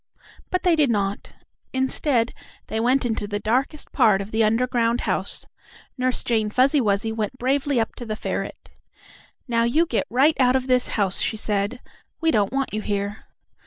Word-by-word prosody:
But 365 - -1
they 355 -3 +4
did 300 -4 +3
not. 200 -2 -2 0.4
Instead, 260 -2 +1 0.3
they 220 - -3
went 250 +3 +2
into 220 -3 -1
the 205 0 -2
darkest 255 +8 -1
part 220 -7 +4
of 200 +2 -6
the 220 0 +2
underground 235 +1 +1
house. - - 0 0.5
Nurse 255 -1 0
Jane 220 -3 0
Fuzzy 265 +6 +3
Wuzzy 210 0 0
went 220 +2 -3
bravely 270 +1 +1
up 225 - -1
to 240 - -7
the 215 - -2
ferret. - - -5 0.8
"Now 230 -1 +1
you 295 +9 +3
get 240 - -1
right 275 +7 +3
out 255 -1 +4
of 260 -1 0
this 255 -1 +2
house," 195 -3 +1
she 220 - -1
said. 210 +3 -2 0.4
"We 325 -1 +2
don't 205 -7 +1
want 270 -3 -2
you 215 - -1
here!" 205 0 -3
235 Hz, 175 wpm, -23 LUFS, 215-260 Hz, 0.8 s, they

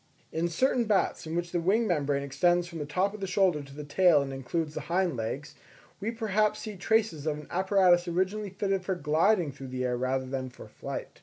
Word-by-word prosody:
In 165 +2 0
certain 240 +7 +1
bats 205 -5 +1
in 160 - -4
which 175 0 -2
the 175 - 0
wing 210 +7 +2
membrane 145 -7 0
extends 175 +6 +2
from 170 -2 -7
the 145 - -4
top 185 +7 0
of 215 - -8
the 195 - -3
shoulder 185 -5 +2
to 140 -1 -12
the 150 - -6
tail 150 0 +4
and 135 -1 -6
includes 150 +4 -3
the - - -4
hind 175 -3 +1
legs, 130 +6 -4 0.5
we 205 +3 -2
perhaps 215 -2 0
see 215 -2 -6
traces 185 -5 0
of 150 -1 0
an 150 - -10
apparatus 185 -1 +3
originally 190 +4 -1
fitted 195 0 -1
for 190 +1 -1
gliding 165 +2 +2
through 135 0 -9
the 130 0 -3
air 125 0 0
rather 130 +1 -1
than 130 0 -4
for 125 - -12
flight. - - -7
175 Hz, 220 wpm, -29 LUFS, 145-195 Hz, 0.5 s, tail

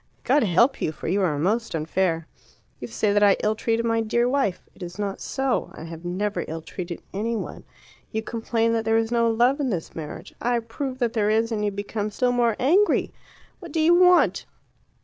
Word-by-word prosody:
God 295 - +3
help 235 +7 +3
you, - - 0
for - - -8
you 195 +5 +1
are 160 -6 +1
most 210 +7 0
unfair. 165 +1 -1 0.5
You 120 - -6
say 200 - 0
that 205 - +3
I 200 -1 +5
ill 215 - +2
treated 230 +1 -1
my 230 0 +1
dear 235 +2 +1
wife. 255 -8 -1
It - - -20
is 175 +1 -7
not 200 -2 -3
so. 270 -2 -1
I - - -9
have 165 0 -9
never 195 +4 -2
ill 160 0 -6
treated 175 0 -7
any 225 +4 -1
one. - - -6 0.5
You 220 0 -2
complain 230 0 0
that 225 -1 0
there 225 0 +2
is 225 0 0
no 235 -1 +3
love 240 +5 +2
in 275 -3 0
this 175 -7 -4
marriage. 155 -2 -8
I 240 0 +1
prove 255 +3 -4
that 240 -3 0
there 210 -3 +1
is, 225 +2 +1
and 210 -2 -1
you 210 - +2
become 205 +1 -4
still 245 +4 0
more 240 -2 +2
angry. 365 +11 +2 0.5
What 345 -5 -10
do 320 - -1
you 320 +2 +5
want? 360 0 +4
225 Hz, 210 wpm, -24 LUFS, 190-240 Hz, 0.5 s, I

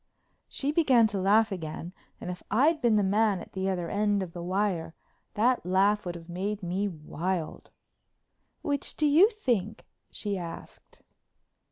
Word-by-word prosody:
She 285 +1 -2
began 270 -8 +4
to 200 -2 -3
laugh 210 +4 +3
again, 170 -1 -6 0.3
and 180 - -5
if 180 - -8
I'd 300 +9 +3
been 235 -3 +3
the 205 - +3
man 205 0 +2
at - - -11
the 190 0 -1
other 175 -3 -2
end 205 +1 +1
of 170 -3 -8
the 175 - -6
wire 180 -2 -1 0.4
that 245 +4 +2
laugh 195 +2 +2
would 175 - -4
have 165 -1 -10
made 195 +4 -3
me 185 +4 -1
wild. 170 0 -4 0.9
"Which 285 -1 -2
do 305 - +1
you 320 +8 +6
think?" 235 - -2 0.2
she 205 -3 -4
asked. 170 -1 -10
200 Hz, 160 wpm, -28 LUFS, 180-225 Hz, 0.9 s, you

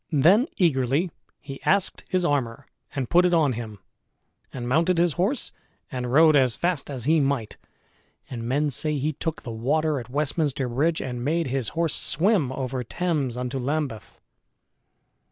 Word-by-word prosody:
Then 175 - +5
eagerly 150 0 +1 0.3
he 135 -2 -9
asked 195 0 +1
his 185 -1 +1
armor 130 -7 -1 0.3
and 135 -3 -2
put 175 +7 +4
it 180 -1 +3
on 150 -5 +3
him, 110 -2 -6 0.7
and 120 -2 -5
mounted 165 +7 +2
his 170 -2 +3
horse 205 - -1 0.4
and 125 -2 -3
rode 155 +2 +6
as 130 -5 +3
fast 175 -5 -1
as 130 -4 -5
he 160 +5 +3
might; 135 -6 -1 0.7
and 115 -2 -6
men 145 +3 +1
say 150 +2 -2
he 150 +3 -1
took 160 +2 -4
the 120 - -6
water 145 +6 0
at 120 -1 -9
Westminster 145 -1 -1
Bridge, 150 +7 0
and 125 -2 -4
made 165 +4 0
his 130 -3 -2
horse 165 -2 +1
swim 170 - +2
over 130 -1 -3
Thames 145 -3 -2
unto 125 +2 -3
Lambeth. 135 -3 -3
145 Hz, 160 wpm, -25 LUFS, 125-165 Hz, 0.7 s, rode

